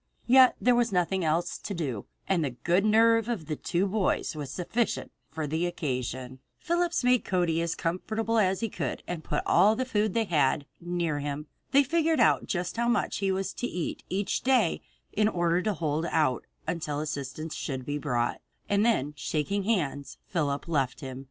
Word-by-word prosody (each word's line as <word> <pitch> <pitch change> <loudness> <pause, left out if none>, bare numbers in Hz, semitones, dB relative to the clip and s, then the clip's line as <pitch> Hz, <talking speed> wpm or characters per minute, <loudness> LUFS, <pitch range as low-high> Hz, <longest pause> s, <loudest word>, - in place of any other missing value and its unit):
Yet 255 +1 +7
there 250 - +4
was 240 -2 +2
nothing 180 0 +1
else 165 +2 0
to 200 - -5
do, 135 - -3 0.2
and 180 -4 +2
the 140 - 0
good 175 +4 +3
nerve 225 +1 +4
of 210 -10 -2
the 155 - -3
two 175 +5 0
boys 195 -4 0
was 145 -3 -5
sufficient 200 - -2 0.2
for 160 -1 -4
the 160 +4 0
occasion. 130 -5 -4 0.2
Phillips 345 -3 0
made 250 -1 +4
Cody 175 -3 +1
as 170 0 -1
comfortable 220 +6 -1
as 190 -1 +2
he 225 - +1
could - - -4
and 170 -3 -4
put 150 - -2
all 200 +5 +5
the 255 - -1
food 215 -5 0
they 230 - +3
had 145 -6 +1
near 170 -3 -1
him. 145 +1 -4 0.2
They 280 +1 +5
figured 320 +1 +1
out 230 - +4
just 180 +3 -2
how 235 0 +1
much 240 - +1
he 195 -1 0
was 190 0 -2
to 245 - -3
eat 175 -8 -4
each 195 +1 -1
day 250 -9 +2 0.3
in 210 0 +3
order 175 -3 +1
to 215 +2 0
hold 155 0 -1
out 150 -8 +1 0.2
until 155 -4 -2
assistance 150 +1 -4
should 130 -3 -4
be 145 +2 -2
brought, 120 -5 -1 0.3
and 200 +1 +2
then 150 - +1
shaking 160 +7 -1
hands, 145 -10 -1
Phillips 145 -5 -1
left 135 -6 0
him. 130 -1 -6
175 Hz, 185 wpm, -28 LUFS, 150-215 Hz, 0.3 s, Yet